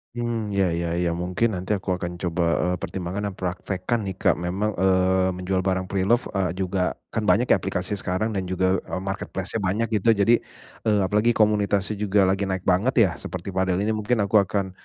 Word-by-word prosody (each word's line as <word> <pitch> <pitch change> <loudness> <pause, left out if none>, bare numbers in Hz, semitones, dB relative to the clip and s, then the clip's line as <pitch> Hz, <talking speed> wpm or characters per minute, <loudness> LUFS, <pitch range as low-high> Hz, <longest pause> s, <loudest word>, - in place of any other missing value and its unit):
Mmm. 115 -4 -2
Iya 100 - +3
iya 85 0 -1
iya, 90 - +1
mungkin 90 +6 0
nanti 90 +3 -4
aku 95 0 -6
akan 90 -1 -5
coba, 85 0 -1 0.2
eee, 90 0 +1
pertimbangkan 95 +4 -4
dan 100 - -6
praktekkan 95 +4 -2
nih 95 - -4
Kak, - - +2
memang, 95 +5 -1
eee, 95 0 +3
menjual 90 +1 -1
barang 95 0 0
preloved, 100 +6 +1
eee, 95 -4 0
juga 95 -1 -1 0.2
kan - - -1
banyak - - +4
ya - - +7
aplikasi 90 +2 -3
sekarang 95 +5 -1
dan 95 -3 -3
juga, 95 +1 +1
eee, 90 - -4
marketplace-nya 95 +2 -4
banyak 100 +4 0
gitu. 115 - +2
Jadi, 105 +4 +4 0.5
eee, 105 -1 +3
apalagi 105 +5 +2
komunitasnya 105 -1 +1
juga 100 -1 +3
lagi 95 +1 +1
naik 95 -1 -2
banget 95 +8 +2
ya, 95 - +2
seperti 90 +2 -6
padel 95 0 0
ini 110 - +1
mungkin 110 0 0
aku 105 +2 +4
akan, 95 0 -1
95 Hz, 195 wpm, -24 LUFS, 90-105 Hz, 0.5 s, ya